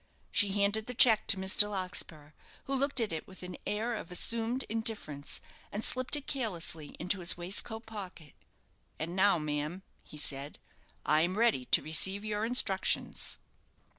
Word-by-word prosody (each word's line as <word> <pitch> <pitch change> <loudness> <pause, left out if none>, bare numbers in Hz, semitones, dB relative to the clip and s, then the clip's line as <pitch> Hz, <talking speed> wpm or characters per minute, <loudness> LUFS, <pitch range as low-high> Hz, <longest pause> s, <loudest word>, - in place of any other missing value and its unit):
She 200 -2 +4
handed 205 +2 +2
the 250 - -3
cheque 225 -3 +6
to 200 - +4
Mr. 190 +2 +5
Larkspur, 180 -6 -3 0.3
who 275 - -3
looked 275 0 +1
at 220 -6 0
it 160 - -4
with 190 -1 -12
an 180 0 -6
air 220 +3 -1
of 185 - -7
assumed 230 +7 0
indifference, 215 -10 -3 0.3
and 210 +2 -3
slipped 255 +3 0
it 290 -1 -5
carelessly 170 - -3
into 180 +4 -1
his 175 -1 +3
waistcoat 205 +6 -2
pocket. 190 -9 -9 0.6
"And 165 +3 -4
now, 195 0 +5
ma'am," 150 +4 -3 0.2
he 150 - -12
said, 140 0 -2 0.5
"I 155 +1 +4
am 180 +4 0
ready 225 - +3
to - - +3
receive 190 +6 +1
your 210 0 -1
instructions." 225 -5 0
195 Hz, 160 wpm, -31 LUFS, 165-225 Hz, 0.6 s, cheque